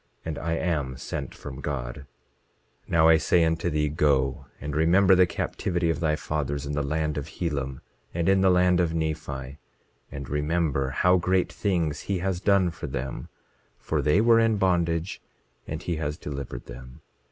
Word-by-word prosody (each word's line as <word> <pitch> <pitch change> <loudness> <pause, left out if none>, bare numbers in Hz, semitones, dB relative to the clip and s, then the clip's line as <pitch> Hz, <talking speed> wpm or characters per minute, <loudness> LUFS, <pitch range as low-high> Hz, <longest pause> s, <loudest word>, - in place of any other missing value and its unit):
And 80 -2 -4
I 85 0 -2
am 75 -7 -1
sent - - -5
from 65 +2 -8
God. 70 -1 -5 0.8
27:16 - - -22
Now 80 -1 +5
I 80 -1 +7
say 85 +2 +3
unto 80 +1 0
thee: 75 -1 +1
Go, 70 -3 +1
and 75 0 -5
remember 90 +5 +5
the 90 -1 +5
captivity 85 -1 -1
of 80 - -3
thy 80 -2 +1
fathers 75 -2 -3
in 70 - -4
the 75 - 0
land 75 +1 -1
of 70 - -7
Helam, 70 -6 -3 0.3
and 85 0 -1
in 95 0 +4
the 95 - +5
land 90 -1 +4
of 85 -2 +1
Nephi; 75 -4 -4 0.5
and 70 -1 -6
remember 75 -1 0
how 90 +7 +3
great 90 +1 +1
things 85 -7 0
he 100 - -2
has 90 0 -1
done 100 -2 +3
for - - -7
them; 65 +2 -5 0.5
for - - -1
they 75 +7 +3
were 115 0 +5
in 115 -1 +3
bondage, 85 -2 0 0.5
and 80 +2 -5
he 85 -2 -2
has 75 -1 -3
delivered 70 -4 -6
them. 65 +1 -11
80 Hz, 175 wpm, -26 LUFS, 70-90 Hz, 0.8 s, I